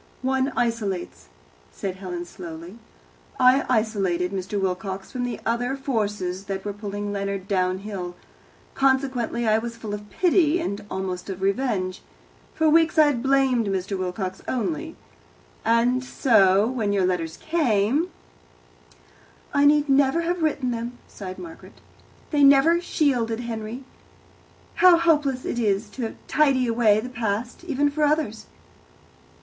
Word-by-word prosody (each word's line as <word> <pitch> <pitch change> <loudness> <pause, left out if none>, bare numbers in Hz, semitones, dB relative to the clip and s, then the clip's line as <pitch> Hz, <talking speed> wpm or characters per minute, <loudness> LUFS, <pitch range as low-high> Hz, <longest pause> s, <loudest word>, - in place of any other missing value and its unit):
"One 265 +1 +1
isolates," 215 - -2 0.4
said 190 - -5
Helen 180 -2 -5
slowly. 170 +3 -9 0.6
"I 255 +2 +5
isolated 195 -7 0
Mr. 195 +1 -3
Wilcox 190 0 -3
from 250 -1 -2
the 245 - -4
other 245 +3 0
forces 205 -8 -2
that 195 0 -5
were 205 - -3
pulling 205 0 -5
Leonard 200 -1 -3
downhill. 185 -1 -2 0.6
Consequently, 260 -3 +1
I 215 0 +4
was 230 0 -6
full 220 -2 -6
of 210 0 -7
pity, 340 - +3
and 205 -12 -3
almost 185 0 -4
of 190 0 -5
revenge. 195 -3 -1 0.5
For 320 - +2
weeks 325 +1 +4
I 310 - +8
had 280 -5 +1
blamed 265 -4 +2
Mr. 195 0 -2
Wilcox 185 0 -4
only, 315 +6 -2 0.7
and 240 +3 +2
so, 205 -6 +4
when 225 -4 -1
your 195 -2 +2
letters 165 -3 -2
came 290 - +1 0.7
" - - -29
"I 285 - +4
need 295 0 +4
never 275 +3 +3
have 345 +1 -2
written 285 -5 0
them," 235 +1 -4
sighed 185 -2 -8
Margaret. 330 -2 -11 0.5
"They 295 -2 +2
never 280 +5 +6
shielded 245 -9 0
Henry. 230 +1 -5 0.9
How 360 -2 +7
hopeless 295 -6 +1
it 240 - -2
is 210 -1 0
to 235 -4 -5
tidy 275 -4 +3
away 225 -3 +3
the 250 - -6
past, 235 +2 -3
even 290 -3 +1
for 305 +1 -1
others!" 295 -8 0
230 Hz, 135 wpm, -24 LUFS, 195-270 Hz, 0.9 s, I